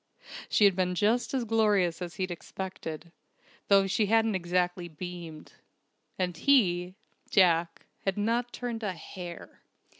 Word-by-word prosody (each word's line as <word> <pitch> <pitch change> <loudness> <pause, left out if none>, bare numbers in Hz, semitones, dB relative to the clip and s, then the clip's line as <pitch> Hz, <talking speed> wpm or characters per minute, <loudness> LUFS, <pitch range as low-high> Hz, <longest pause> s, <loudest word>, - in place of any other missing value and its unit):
She 210 - +4
had 195 -2 +5
been 180 -1 0
just 220 +6 +1
as 265 -3 0
glorious 205 -6 +2
as 175 -2 -5
he'd 185 0 -2
expected, 170 -2 -7 0.6
though 195 -1 +5
she 205 +2 +1
hadn't 225 +1 +3
exactly 180 -1 -1
beamed. 170 -1 -8 0.6
And 180 -2 -1
he 180 - +2 0.3
Jack 170 -4 +3 0.2
had 195 0 -1
not 235 +3 0
turned 235 -2 -4
a 205 -4 -2
hair! 175 +1 -9
185 Hz, 130 wpm, -29 LUFS, 175-215 Hz, 0.6 s, had